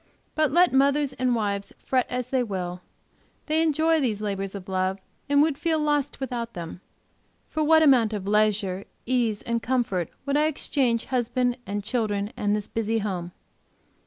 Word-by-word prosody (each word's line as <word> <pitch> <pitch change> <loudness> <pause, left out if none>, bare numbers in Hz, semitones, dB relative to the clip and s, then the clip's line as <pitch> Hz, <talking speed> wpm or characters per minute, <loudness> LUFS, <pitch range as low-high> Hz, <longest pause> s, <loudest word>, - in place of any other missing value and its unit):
But 310 -3 +2
let 350 +1 +4
mothers 280 +1 +3
and 250 -1 +1
wives 200 -3 -2
fret 255 -2 +1
as 250 0 -3
they 260 -1 +1
will, 180 -5 -4 0.6
they 315 +1 +2
enjoy 320 +1 +3
these 225 -6 0
labors 195 -2 -3
of 190 -2 -8
love, 190 0 0 0.3
and 285 0 +5
would 300 -3 0
feel 330 -2 +1
lost 295 -2 0
without 240 -3 -4
them. 170 +1 -7 0.7
For 310 - -1
what 315 +1 +5
amount 250 -7 +5
of 205 -3 -4
leisure, 205 -2 +1 0.2
ease 235 -4 0
and 235 0 -1
comfort 225 -10 0 0.2
would 280 0 +1
I 305 +1 +3
exchange 260 -6 0
husband 245 0 +1
and 205 +1 -3
children 210 -2 -1
and 205 0 0
this 210 -1 -3
busy 225 0 -1
home? 185 -5 -3
235 Hz, 165 wpm, -25 LUFS, 205-275 Hz, 0.7 s, and